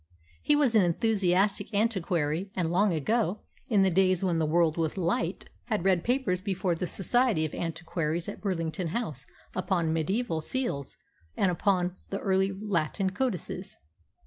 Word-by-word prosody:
He 295 - +3
was 285 -5 +3
an 220 - +6
enthusiastic 195 +2 +1
antiquary, 185 -5 0
and 170 -3 0
long 195 +3 +3
ago, 205 - 0 0.3
in 205 -5 +3
the 190 - +3
days 185 0 +3
when 175 -3 +1
the 160 - +1
world 165 0 +3
was 165 +1 -1
light, 170 0 -1 0.2
had 215 -6 -2
read 185 -3 +3
papers 245 -8 +1
before 185 -2 -1
the 170 +2 -3
Society 215 -3 +2
of 155 - -5
Antiquaries 165 0 -3
at 205 - -7
Burlington 175 -3 -2
House 175 - -4 0.3
upon 180 -3 0
mediaeval 165 +2 -1
seals 155 - -3 0.4
and 190 - +3
upon 180 0 0
the 195 - -2
early 190 0 +1
Latin 190 -2 -1
codices. 205 - -3
185 Hz, 150 wpm, -28 LUFS, 165-205 Hz, 0.4 s, an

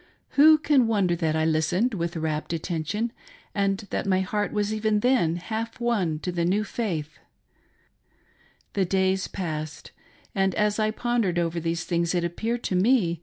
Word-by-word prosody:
Who 310 +2 +7
can 285 -5 +3
wonder 200 -6 +2
that 160 -2 0
I 160 0 +1
listened 160 +9 +1
with 170 -3 -2
rapt 155 0 -2
attention, 175 +7 -2 0.4
and 195 -1 +1
that - - -2
my 190 -1 +3
heart 205 +2 -1
was 210 0 0
even 215 -1 +1
then 240 -10 +3
half 220 +7 -4
won 205 -10 0
to 180 - -2
the 170 -1 -1
new 195 +5 +2
faith 170 -9 -4 0.8
> - - -37
The 195 - +2
days 190 +1 +1
passed; 155 -5 -5 0.4
and 195 -3 +1
as 210 0 +1
I 215 0 +2
pondered 225 -5 0
over 170 0 0
these 165 0 -2
things 170 0 0
it 175 - +1
appeared 225 +8 -2
to 185 - -1
me. 185 - +3
190 Hz, 170 wpm, -25 LUFS, 170-215 Hz, 0.8 s, Who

